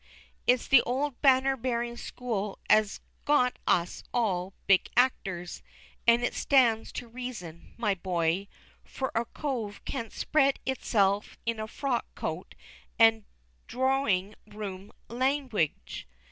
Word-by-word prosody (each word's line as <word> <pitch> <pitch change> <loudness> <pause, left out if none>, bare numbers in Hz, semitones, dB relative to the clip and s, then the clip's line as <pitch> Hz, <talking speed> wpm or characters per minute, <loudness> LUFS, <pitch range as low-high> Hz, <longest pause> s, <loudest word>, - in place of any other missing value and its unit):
It's 250 0 +3
the 270 -3 +7
old 265 +1 -2
banner 270 -1 +4
bearing 240 -1 -2
school 215 -5 -4
as 215 -1 +3 0.2
got 255 -4 +2
us 175 0 +1
all 195 -7 0
our 190 - -18
big 195 -2 +4
actors, 190 -8 0 0.5
an' 235 +1 +5
it - - 0
stands 240 -5 +3
to 245 - -6
reason, 225 -9 -8
my 215 -4 +1
boy; 180 0 -1 0.4
for 265 - -4
a 230 +1 0
cove 230 -8 -4
can't 230 -5 -4
spred 275 -3 +2
hisself 205 -6 +1
in 230 -1 -1
a 215 - -3
frock 255 +1 -2
coat - - -5 0.4
and 225 -2 +5 0.4
droring 245 -7 +1
room 205 -2 -7 0.2
langwidge. 255 - -1
230 Hz, 125 wpm, -29 LUFS, 200-260 Hz, 0.5 s, the